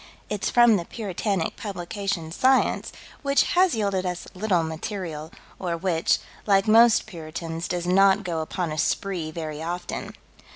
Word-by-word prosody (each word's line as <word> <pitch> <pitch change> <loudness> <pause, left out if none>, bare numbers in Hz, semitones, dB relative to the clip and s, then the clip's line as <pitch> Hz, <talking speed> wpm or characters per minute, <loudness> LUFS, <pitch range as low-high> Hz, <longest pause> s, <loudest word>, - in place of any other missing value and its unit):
It's 210 -2 -1
from 240 -3 +6
the 170 - -4
puritanic 200 -4 -2
publication, 195 -3 -4
Science, 260 +9 +2 0.3
which 280 -1 +3
has 365 -5 +4
yielded 200 -4 0
us 180 -1 -4
little 185 -3 +1
material, 160 -1 -5 0.3
or 175 -2 -2
which, 170 -2 +1 0.3
like 195 +1 +4
most 230 +1 +6
puritans, 165 -2 -6
does 175 -1 -2
not 195 +2 +4
go 170 -3 -2
upon 160 +1 -3
a 155 - -3
spree 180 -4 -1
very 155 -1 -5
often. 175 +2 -5
185 Hz, 140 wpm, -25 LUFS, 165-205 Hz, 0.3 s, from